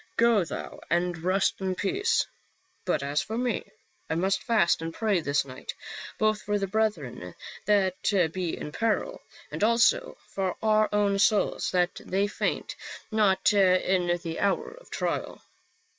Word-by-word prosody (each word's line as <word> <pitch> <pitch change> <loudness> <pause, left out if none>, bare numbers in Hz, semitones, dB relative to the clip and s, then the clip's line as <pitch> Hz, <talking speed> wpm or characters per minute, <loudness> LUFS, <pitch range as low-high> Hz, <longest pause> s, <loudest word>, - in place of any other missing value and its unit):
Go 230 -4 +4
thou 165 - -7
and 175 +1 +1
rest 185 +4 0
in 190 -1 -1
peace; 395 - +1 0.6
but 155 -6 0
as 145 +2 0
for 215 +4 -4
me, 245 -3 -1 0.4
I 160 - 0
must 190 +3 +1
fast 220 -9 +2
and 165 0 -3
pray 210 0 +1
this 145 -3 0
night, 130 -1 -8 0.4
both 215 -1 +1
for 205 0 0
the 200 - -1
brethren 180 - -2 0.3
that 190 -3 +2
be 180 -3 -2
in 150 - -6
peril, 230 - -1 0.3
and - - -3
also 235 - +3
for 190 -2 -2
our 215 0 +3
own 205 -1 +2
souls 210 0 +2
that 180 -1 0
they 195 +2 0
faint 205 - -2 0.4
not 210 -1 +3
in 185 -2 +3
the 165 -1 -4
hour 200 -1 0
of - - -16
trial." - - -3
195 Hz, 150 wpm, -27 LUFS, 175-215 Hz, 0.6 s, Go